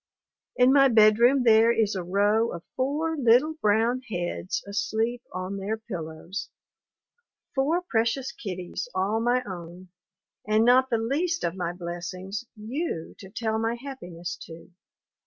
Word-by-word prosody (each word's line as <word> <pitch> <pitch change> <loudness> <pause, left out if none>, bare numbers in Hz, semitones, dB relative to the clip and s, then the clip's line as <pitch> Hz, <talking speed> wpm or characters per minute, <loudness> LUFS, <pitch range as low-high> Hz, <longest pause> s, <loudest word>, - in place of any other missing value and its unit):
In 250 +1 +5
my 275 -1 +7
bedroom 235 +3 +5
there 225 0 +6
is 220 -3 +1
a 190 - -2
row 205 +5 +2
of 170 0 -7
four 295 +5 0
little 265 +3 +4
brown 225 +4 +2
heads 175 -1 -3
asleep 220 +5 -1
on 185 +2 -4
their 205 +3 -2
pillows. 180 -3 -6 1.0
Four 305 +6 +1
precious 240 -3 0
kiddies 185 +3 -6
all 195 +4 +1
my 245 +2 +1
own. 180 -2 -9 0.6
And 215 +1 +3
not 255 +2 +5
the 235 - +2
least 310 +9 -1
of 170 - 0
my 175 -2 -2
blessings, 180 +4 -6
you 220 - -4
to 190 - -11
tell 220 +2 -2
my 225 +1 0
happiness 180 -10 -7
to. 165 +2 -12
220 Hz, 140 wpm, -26 LUFS, 185-250 Hz, 1.0 s, my